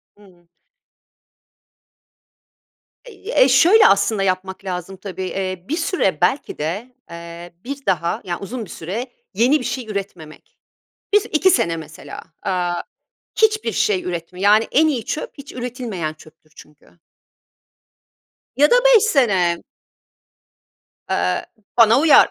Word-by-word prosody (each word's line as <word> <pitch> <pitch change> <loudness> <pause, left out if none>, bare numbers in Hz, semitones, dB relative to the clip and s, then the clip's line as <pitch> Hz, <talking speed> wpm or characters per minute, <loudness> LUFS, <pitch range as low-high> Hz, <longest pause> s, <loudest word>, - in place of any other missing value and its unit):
Hı. 180 -4 -22 2.6
Eee, 470 0 -4
ye 255 - +7
şöyle 355 - +6
aslında 200 0 +2
yapmak 190 +1 -2
lazım, 185 0 -5
tabii. 190 -1 -7
Eee, 185 -1 -4
bir 315 - -2
süre 325 - 0
belki 190 +11 0
de, 205 +12 -4
eee, 170 +1 -10
bir 275 +2 -7
daha, 170 -3 0
yani, 175 -2 -4
uzun 225 +3 -6
bir - - -17
süre 205 +10 -5 0.3
yeni 250 +9 +3
bir - - -6
şey 250 -4 -4
üretmemek. 190 -7 -7 0.6
1-2 385 -4 +3
sene 165 - +1
mesela, 155 -1 -10 0.2
aaa, 175 -2 -1 0.6
hiçbir 430 - +2
şey 190 -3 +1
üretme, 180 +1 -6
yani, 210 +3 +4
en 315 +2 +4
iyi 255 -7 -2
çöp 260 +6 -4
hiç 280 0 -10
üretilmeyen 240 -10 -5
çöptür 155 0 -20
çünkü. 150 +3 -19 1.6
Ya 290 +2 +5
da - - +7
5 - - +7
sene. 195 - +2 1.5
Eee, 90 +1 0 0.3
bana 230 +2 +6
uyar. 315 0 +6
195 Hz, 125 wpm, -20 LUFS, 175-260 Hz, 2.6 s, ye